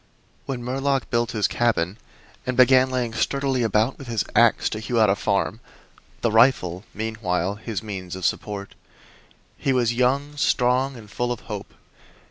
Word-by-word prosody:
When 130 Hz, -3 st, -4 dB
Murlock 135 Hz, +2 st, -1 dB
built 120 Hz, -1 st, +1 dB
his 105 Hz, -2 st, +2 dB
cabin 105 Hz, -4 st, 0 dB, 0.5 s
and 130 Hz, -, -1 dB
began 130 Hz, 0 st, +6 dB
laying 125 Hz, -3 st, -2 dB
sturdily 135 Hz, +1 st, 0 dB
about 110 Hz, +2 st, +1 dB
with 135 Hz, -, -9 dB
his 115 Hz, -3 st, -1 dB
ax -, -, +4 dB
to 110 Hz, -, -4 dB
hew 115 Hz, +2 st, -1 dB
out 110 Hz, -3 st, +5 dB
a -, -, +2 dB
farm 100 Hz, +2 st, -1 dB, 0.6 s
the 115 Hz, -, +1 dB
rifle, 110 Hz, -6 st, +3 dB
meanwhile, 105 Hz, -4 st, -2 dB
his 110 Hz, 0 st, -5 dB
means 95 Hz, -4 st, -6 dB
of 95 Hz, -2 st, -5 dB
support 100 Hz, -1 st, -2 dB, 0.9 s
he 135 Hz, -, +1 dB
was 120 Hz, -2 st, +2 dB
young, 135 Hz, +4 st, +1 dB
strong 130 Hz, 0 st, +2 dB
and 110 Hz, -2 st, -12 dB
full 120 Hz, +3 st, -2 dB
of 120 Hz, -, -4 dB
hope. -, -, -7 dB
115 Hz, 160 wpm, -23 LUFS, 105-130 Hz, 0.9 s, began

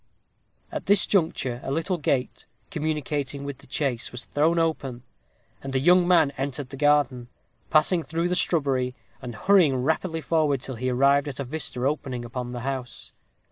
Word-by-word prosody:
At -, -, -5 dB
this 200 Hz, -1 st, +5 dB
juncture 160 Hz, -10 st, 0 dB
a -, -, -4 dB
little 165 Hz, +4 st, -1 dB
gate, 135 Hz, -3 st, -1 dB, 0.2 s
communicating 150 Hz, -4 st, -2 dB
with 140 Hz, -2 st, -6 dB
the -, -, -16 dB
chase, 130 Hz, -3 st, -2 dB
was 125 Hz, -1 st, -7 dB
thrown 160 Hz, +4 st, +1 dB
open, 140 Hz, -7 st, -1 dB, 0.6 s
and 135 Hz, 0 st, -5 dB
a -, -, +3 dB
young 175 Hz, +5 st, +5 dB
man 165 Hz, -6 st, +4 dB
entered 135 Hz, -1 st, -3 dB
the 135 Hz, -, -8 dB
garden, 140 Hz, -4 st, +2 dB, 0.4 s
passing 160 Hz, +3 st, +3 dB
through 165 Hz, +2 st, -2 dB
the 180 Hz, -, 0 dB
shrubbery, 135 Hz, -8 st, +1 dB, 0.3 s
and 120 Hz, -2 st, -7 dB
hurrying 175 Hz, -, +4 dB
rapidly 160 Hz, +3 st, -1 dB
forward 155 Hz, -4 st, +1 dB
till 130 Hz, +1 st, -5 dB
he 130 Hz, +2 st, -1 dB
arrived 140 Hz, +3 st, +3 dB
at 140 Hz, -1 st, -6 dB
a -, -, -1 dB
vista 130 Hz, -2 st, -2 dB
opening 135 Hz, -4 st, -2 dB
upon 120 Hz, +1 st, -5 dB
the 120 Hz, -1 st, -5 dB
house. 130 Hz, -1 st, -5 dB
140 Hz, 170 wpm, -25 LUFS, 130-160 Hz, 0.6 s, this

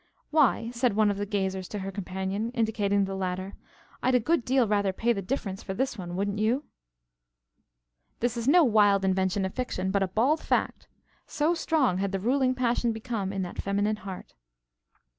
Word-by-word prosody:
"Why," 270 Hz, -6 st, +3 dB
said 240 Hz, -3 st, 0 dB
one 215 Hz, -1 st, +4 dB
of 200 Hz, -, -4 dB
the 205 Hz, 0 st, -3 dB
gazers 190 Hz, -2 st, -2 dB
to 210 Hz, -, -6 dB
her 195 Hz, 0 st, -4 dB
companion, 190 Hz, +3 st, -3 dB
indicating 205 Hz, -3 st, +1 dB
the 195 Hz, -, -5 dB
latter, 185 Hz, 0 st, -3 dB, 0.5 s
"I'd 255 Hz, 0 st, +2 dB
a -, -, +5 dB
good 305 Hz, +4 st, +1 dB
deal 255 Hz, -1 st, +2 dB
rather 200 Hz, -2 st, +1 dB
pay 235 Hz, +5 st, +1 dB
the 200 Hz, -, -3 dB
difference 195 Hz, -3 st, -3 dB
for 190 Hz, -, -5 dB
this 265 Hz, +2 st, -1 dB
one, 175 Hz, -4 st, -6 dB
wouldn't 200 Hz, +2 st, -1 dB
you?" 235 Hz, +7 st, +1 dB, 1.6 s
This 240 Hz, 0 st, 0 dB
is 235 Hz, +1 st, -3 dB
no 340 Hz, +4 st, +6 dB
wild 205 Hz, -5 st, +4 dB
invention 190 Hz, 0 st, +1 dB
of 190 Hz, -, -4 dB
fiction, 190 Hz, -7 st, -2 dB
but 200 Hz, 0 st, +1 dB
a 195 Hz, -, +2 dB
bald 250 Hz, -, +2 dB
fact. -, -, -1 dB, 0.4 s
So 305 Hz, +3 st, +1 dB
strong 295 Hz, -, +1 dB
had 195 Hz, 0 st, -1 dB
the 195 Hz, -, 0 dB
ruling 255 Hz, +4 st, +1 dB
passion 240 Hz, -1 st, +1 dB
become 220 Hz, -4 st, -3 dB
in 195 Hz, -1 st, -2 dB
that 180 Hz, -, -5 dB
feminine 205 Hz, +2 st, 0 dB
heart. 190 Hz, -2 st, -9 dB
205 Hz, 185 wpm, -27 LUFS, 190-245 Hz, 1.6 s, no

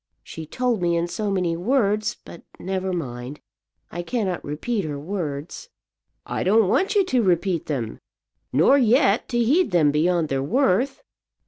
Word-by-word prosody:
She 160 Hz, -1 st, -9 dB
told 245 Hz, 0 st, -1 dB
me 170 Hz, -1 st, +1 dB
in 170 Hz, +1 st, 0 dB
so 210 Hz, +4 st, -3 dB
many 180 Hz, -4 st, 0 dB
words; 210 Hz, +1 st, 0 dB
but 170 Hz, -, -11 dB, 0.2 s
never 190 Hz, 0 st, -3 dB
mind, 130 Hz, -5 st, -5 dB, 0.5 s
I 175 Hz, -, -4 dB
cannot 190 Hz, -2 st, -2 dB
repeat 195 Hz, +9 st, -3 dB
her 150 Hz, -3 st, -4 dB
words." 160 Hz, -, -5 dB, 0.6 s
"I -, -, -3 dB
don't 210 Hz, +2 st, +4 dB
want 385 Hz, -, +1 dB
you 400 Hz, -2 st, +4 dB
to 255 Hz, -8 st, +1 dB
repeat 180 Hz, -3 st, 0 dB
them; 120 Hz, -7 st, -3 dB, 0.5 s
nor 170 Hz, -, +4 dB
yet 240 Hz, -2 st, +3 dB
to 240 Hz, -, -1 dB
heed 280 Hz, +10 st, +3 dB
them 165 Hz, -6 st, +3 dB
beyond 165 Hz, +1 st, +1 dB
their 135 Hz, -1 st, -1 dB
worth. 250 Hz, -, +1 dB
185 Hz, 155 wpm, -23 LUFS, 160-235 Hz, 0.6 s, don't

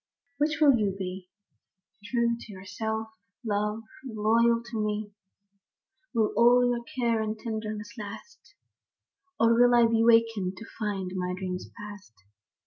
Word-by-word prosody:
HIGH 300 Hz, 0 st, +2 dB
will 280 Hz, -6 st, +6 dB
you 200 Hz, -3 st, 0 dB
be, 185 Hz, -1 st, -6 dB, 0.4 s
— 190 Hz, +2 st, -40 dB
True 235 Hz, 0 st, +1 dB
to 230 Hz, -2 st, -11 dB
yourself, 220 Hz, +4 st, -4 dB, 0.4 s
love, 210 Hz, +1 st, -1 dB, 0.2 s
and 255 Hz, -4 st, -8 dB
loyal 230 Hz, +2 st, +3 dB
to 220 Hz, -2 st, -1 dB
me? 210 Hz, 0 st, -3 dB, 1.0 s
Will 220 Hz, -2 st, +2 dB
all 245 Hz, +1 st, +6 dB
your 240 Hz, -1 st, -1 dB
care 235 Hz, -2 st, 0 dB
and 215 Hz, 0 st, -2 dB
your 215 Hz, -, -19 dB
tenderness 215 Hz, 0 st, -5 dB
last; 215 Hz, -, -10 dB, 0.8 s
Or 230 Hz, 0 st, +5 dB
will 245 Hz, +1 st, +5 dB
I 235 Hz, -1 st, +6 dB
be 225 Hz, 0 st, +2 dB
wakened 225 Hz, -5 st, +3 dB
to 225 Hz, -, -9 dB
find 200 Hz, -4 st, -2 dB
my 180 Hz, 0 st, -2 dB
dreams 185 Hz, -1 st, -5 dB
past? 205 Hz, -, -10 dB
220 Hz, 145 wpm, -28 LUFS, 205-235 Hz, 1.0 s, will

